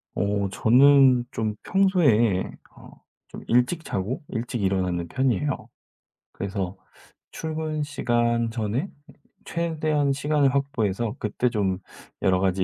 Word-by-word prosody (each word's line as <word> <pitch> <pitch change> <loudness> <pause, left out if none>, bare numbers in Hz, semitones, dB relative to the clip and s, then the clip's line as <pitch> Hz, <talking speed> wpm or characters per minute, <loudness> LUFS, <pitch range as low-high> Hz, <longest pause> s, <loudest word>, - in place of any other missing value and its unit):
어 100 -1 0
저는 130 +3 +5
좀 110 -3 -2
평소에 140 - +3 0.3
어 - - -14 0.4
좀 - - -10
일찍 125 +8 +2
자고 100 - -3
일찍 120 -1 -3
일어나는 90 -3 0
편이에요. 135 - -1 0.7
그래서 100 -2 -4 0.6
출근 155 -1 -3
시간 120 -4 0
전에 115 - -2 0.6
최대한 155 -4 0
시간을 140 0 +1
확보해서 115 -6 -1
그때 110 +4 0
좀 100 -5 0 0.5
여러 95 -1 +3
가지 95 0 +1
120 Hz, 235 characters per minute, -25 LUFS, 100-145 Hz, 0.7 s, 저는